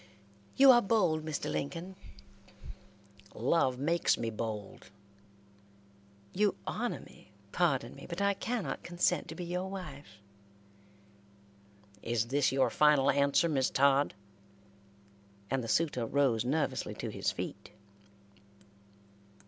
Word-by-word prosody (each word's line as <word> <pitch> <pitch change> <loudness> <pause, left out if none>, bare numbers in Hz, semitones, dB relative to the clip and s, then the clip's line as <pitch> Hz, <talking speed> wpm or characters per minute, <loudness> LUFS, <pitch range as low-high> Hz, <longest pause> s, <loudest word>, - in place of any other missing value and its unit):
"You 270 0 +8
are 240 -1 +6
bold, 180 -8 +1
Mr. 155 -2 -4
Lincoln." 175 +6 -4 1.4
"Love 130 +1 +1
makes 165 +5 +1
me 115 -1 -3
bold." 110 -3 -6 1.4
"You 205 0 +2
honor 240 +2 -3
me, 100 - -18 0.2
pardon 150 -7 0
me, 140 - -11
but 170 +1 -5
I 200 0 +2
cannot 230 +1 -3
consent 175 0 0
to 160 - -8
be 180 - -6
your 180 +2 -3
wife." 145 - -9 1.8
"Is 115 0 -1
this 140 +1 +2
your 135 0 +2
final 145 -2 +4
answer, 140 +4 +2
Miss 135 -5 +1
Todd?" 140 +1 +3 1.4
and 135 -2 0
the - - -5
suitor 125 -1 0
rose 130 -5 +2
nervously 145 +6 -1
to - - -5
his - - -1
feet. - - -7
145 Hz, 115 wpm, -31 LUFS, 130-180 Hz, 1.8 s, You